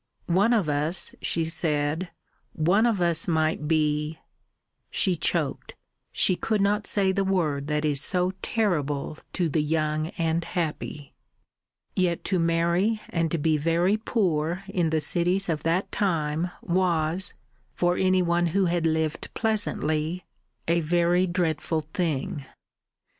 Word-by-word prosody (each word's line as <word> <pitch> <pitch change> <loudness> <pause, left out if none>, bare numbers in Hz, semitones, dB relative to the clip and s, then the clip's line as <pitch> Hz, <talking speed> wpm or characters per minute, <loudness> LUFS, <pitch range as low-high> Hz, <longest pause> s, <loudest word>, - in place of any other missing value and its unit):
"One 195 +6 +3
of 215 -9 +2
us," 150 +4 0
she 165 -1 0
said, 160 +1 -1 0.4
"one 185 +9 +3
of 205 -6 +1
us 170 -1 +1
might 160 -2 0
be 150 0 +1 0.4
" - - -55
She 185 -2 +2
choked; 155 -3 -2 0.4
she 185 - +3
could 215 +3 -1
not 205 +1 +1
say 195 -2 +2
the 195 +1 0
word 155 -7 0
that 150 0 0
is 145 -2 +1
so 180 +3 +1
terrible 155 - -1
to 175 -3 0
the 155 0 +1
young 155 0 0
and 165 0 0
happy. 150 -4 -4 0.8
Yet 180 -2 0
to 185 - 0
marry 170 +6 +1
and 165 -2 -1
be 155 -1 +3
very 170 +6 +2
poor 185 -6 -1
in 180 -4 0
the 155 -1 +1
cities 180 +5 +1
of 160 -3 -1
that 170 +4 0
time 165 -3 0
was 175 0 +1 0.4
for 175 0 +2
any 185 0 +2
one 175 0 +2
who 195 - +3
had 170 -1 +1
lived 160 -1 -1
pleasantly 180 -6 -1 0.4
a 170 +1 +3
very 175 +3 +2
dreadful 165 -2 -1
thing. 150 -4 -2
170 Hz, 135 wpm, -26 LUFS, 155-185 Hz, 0.8 s, One